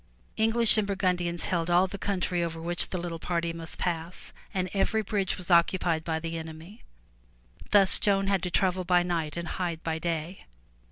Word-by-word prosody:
*' -, -, -34 dB
English 225 Hz, -1 st, +4 dB
and 205 Hz, -, 0 dB
Burgundians 180 Hz, -3 st, -1 dB
held 170 Hz, -2 st, -1 dB
all 175 Hz, +2 st, +5 dB
the 195 Hz, +1 st, -7 dB
country 180 Hz, -3 st, -1 dB
over 165 Hz, -1 st, -4 dB
which 175 Hz, +2 st, -1 dB
the 185 Hz, -, -3 dB
little 170 Hz, -1 st, -4 dB
party 170 Hz, 0 st, -1 dB
must 165 Hz, 0 st, -7 dB
pass 170 Hz, 0 st, -4 dB, 0.2 s
and 185 Hz, -1 st, -1 dB
every 220 Hz, +2 st, +1 dB
bridge 200 Hz, -2 st, -1 dB
was 180 Hz, 0 st, -5 dB
occupied 170 Hz, -1 st, +3 dB
by 160 Hz, -1 st, -1 dB
the 165 Hz, 0 st, -4 dB
enemy. 160 Hz, +5 st, -10 dB, 0.9 s
Thus 195 Hz, -2 st, +6 dB
Joan 195 Hz, -1 st, +2 dB
had 195 Hz, -2 st, +1 dB
to 180 Hz, -, -2 dB
travel 185 Hz, 0 st, +1 dB
by 175 Hz, 0 st, +3 dB
night 165 Hz, -3 st, -2 dB
and 170 Hz, 0 st, -4 dB
hide 170 Hz, -3 st, -3 dB
by 160 Hz, -1 st, -2 dB
day. 170 Hz, +2 st, -4 dB
175 Hz, 185 wpm, -28 LUFS, 165-190 Hz, 0.9 s, Thus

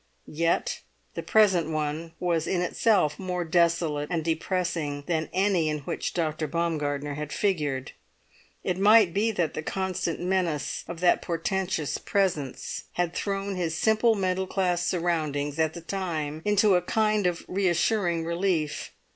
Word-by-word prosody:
Yet 165 Hz, +2 st, 0 dB, 0.3 s
the -, -, -4 dB
present 190 Hz, -7 st, +3 dB
one 155 Hz, +1 st, -3 dB
was 170 Hz, -3 st, 0 dB
in 180 Hz, -, 0 dB
itself 180 Hz, -4 st, +2 dB
more 180 Hz, -2 st, -2 dB
desolate 165 Hz, -3 st, +1 dB
and 165 Hz, -3 st, -1 dB
depressing 165 Hz, -3 st, -1 dB
than 160 Hz, -1 st, -1 dB
any 185 Hz, -4 st, +2 dB
in 150 Hz, -1 st, -2 dB
which -, -, -4 dB
Dr. 155 Hz, -2 st, -1 dB
Baumgartner 145 Hz, -3 st, -1 dB
had 150 Hz, +1 st, -5 dB
figured. 150 Hz, -10 st, -1 dB, 0.7 s
It 180 Hz, 0 st, -1 dB
might 205 Hz, -3 st, +6 dB
be 210 Hz, +3 st, +2 dB
that 170 Hz, -6 st, 0 dB
the -, -, -3 dB
constant 185 Hz, 0 st, -2 dB
menace 175 Hz, -5 st, -1 dB
of 170 Hz, 0 st, -7 dB
that 180 Hz, -, +4 dB
portentous 175 Hz, -2 st, -2 dB
presence 170 Hz, -9 st, -1 dB
had 175 Hz, -1 st, -1 dB
thrown 195 Hz, 0 st, -2 dB
his 165 Hz, -3 st, -2 dB
simple 220 Hz, +2 st, +3 dB
middle 190 Hz, -1 st, 0 dB
class 180 Hz, -3 st, 0 dB
surroundings, 155 Hz, -5 st, -1 dB
at 160 Hz, 0 st, +1 dB
the 170 Hz, -, -7 dB
time, 160 Hz, -4 st, -3 dB
into 210 Hz, 0 st, +4 dB
a 180 Hz, -, +4 dB
kind 215 Hz, +1 st, +1 dB
of 175 Hz, -1 st, -2 dB
reassuring 180 Hz, -2 st, +1 dB
relief. 170 Hz, -3 st, -1 dB
170 Hz, 145 wpm, -27 LUFS, 155-190 Hz, 0.7 s, might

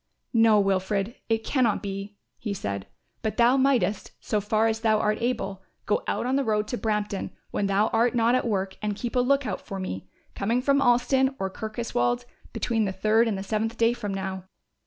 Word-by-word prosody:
"No, 225 Hz, -2 st, +5 dB
Wilfred, 195 Hz, +2 st, 0 dB, 0.2 s
it 225 Hz, 0 st, +1 dB
cannot 235 Hz, -7 st, +1 dB
be," 200 Hz, +1 st, -5 dB, 0.2 s
he 210 Hz, -3 st, -3 dB
said; 100 Hz, -, -4 dB, 0.3 s
"but 220 Hz, -, -2 dB
thou 240 Hz, +2 st, +5 dB
mightest, 255 Hz, -8 st, +1 dB
so 210 Hz, -, -1 dB
far 215 Hz, +2 st, +1 dB
as 225 Hz, 0 st, +1 dB
thou 220 Hz, -1 st, +3 dB
art 210 Hz, 0 st, 0 dB
able, 215 Hz, -6 st, -2 dB, 0.2 s
go 210 Hz, -, +1 dB
out -, -, -1 dB
on 260 Hz, +2 st, +1 dB
the 275 Hz, -, +1 dB
road 210 Hz, -3 st, 0 dB
to 245 Hz, -, -2 dB
Brampton 210 Hz, -2 st, -1 dB, 0.2 s
when 200 Hz, -, 0 dB
thou 200 Hz, +2 st, +3 dB
art 235 Hz, +2 st, +2 dB
not 235 Hz, 0 st, +3 dB
at 255 Hz, -1 st, +1 dB
work 195 Hz, -3 st, -1 dB
and 210 Hz, -1 st, -1 dB
keep 240 Hz, +4 st, -5 dB
a -, -, +4 dB
look 275 Hz, +2 st, +2 dB
out -, -, -3 dB
for 195 Hz, -3 st, -6 dB
me 95 Hz, -, -5 dB, 0.2 s
coming 230 Hz, +5 st, 0 dB
from 280 Hz, +2 st, +2 dB
Alston 265 Hz, +2 st, +3 dB
or 190 Hz, 0 st, -2 dB
Kirkoswald 155 Hz, -, -1 dB, 0.3 s
between 225 Hz, -3 st, 0 dB
the 195 Hz, -, -1 dB
third 215 Hz, +4 st, +3 dB
and 210 Hz, -3 st, -1 dB
the 195 Hz, -, -4 dB
seventh 220 Hz, +3 st, -2 dB
day 230 Hz, +1 st, +3 dB
from 215 Hz, -4 st, -4 dB
now. 190 Hz, -1 st, -4 dB
215 Hz, 200 wpm, -26 LUFS, 195-235 Hz, 0.3 s, No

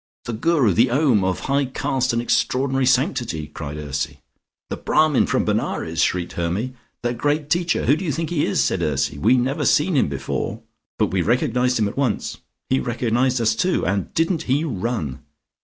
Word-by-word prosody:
"The 120 Hz, -, -4 dB
Guru: 130 Hz, -, +2 dB
the 120 Hz, +6 st, +4 dB
Om, 125 Hz, -6 st, +3 dB
of 95 Hz, -1 st, -1 dB
high 140 Hz, +1 st, +1 dB
caste 130 Hz, 0 st, -1 dB
and 115 Hz, 0 st, -1 dB
extraordinary 135 Hz, +1 st, +1 dB
sanctity," 125 Hz, -, +1 dB
cried 75 Hz, -1 st, -7 dB
Ursy. 70 Hz, -2 st, -4 dB, 0.5 s
"The -, -, -2 dB
Brahmin 155 Hz, -3 st, +2 dB
from -, -, +1 dB
Benares," -, -, -1 dB
shrieked 90 Hz, -1 st, 0 dB
Hermy. 90 Hz, +9 st, -2 dB, 0.3 s
"The 120 Hz, 0 st, 0 dB
great 145 Hz, +4 st, -1 dB
Teacher! 170 Hz, -1 st, +1 dB
Who 140 Hz, -, +4 dB
do 170 Hz, -, -5 dB
you 165 Hz, -, -1 dB
think 165 Hz, +4 st, -3 dB
he 155 Hz, -4 st, +1 dB
is?" -, -, +1 dB
said -, -, 0 dB
Ursy. 70 Hz, -, -1 dB
"We 130 Hz, -, +4 dB
never 130 Hz, +3 st, 0 dB
seen 160 Hz, +3 st, +3 dB
him 135 Hz, -, +3 dB
before 70 Hz, -1 st, -4 dB, 0.2 s
" -, -, -62 dB
"But -, -, +1 dB
we 95 Hz, -1 st, +1 dB
recognised 125 Hz, +4 st, +1 dB
him 110 Hz, -2 st, +1 dB
at 100 Hz, -, -7 dB
once 130 Hz, -7 st, -1 dB, 0.2 s
" -, -, -57 dB
"He 130 Hz, -, +3 dB
recognised 120 Hz, +1 st, 0 dB
us, 115 Hz, -1 st, +2 dB
too, 180 Hz, +11 st, 0 dB
and 95 Hz, +1 st, -1 dB
didn't 165 Hz, 0 st, +1 dB
he 140 Hz, +4 st, +2 dB
run? 110 Hz, -, -3 dB
125 Hz, 190 wpm, -22 LUFS, 105-145 Hz, 0.5 s, the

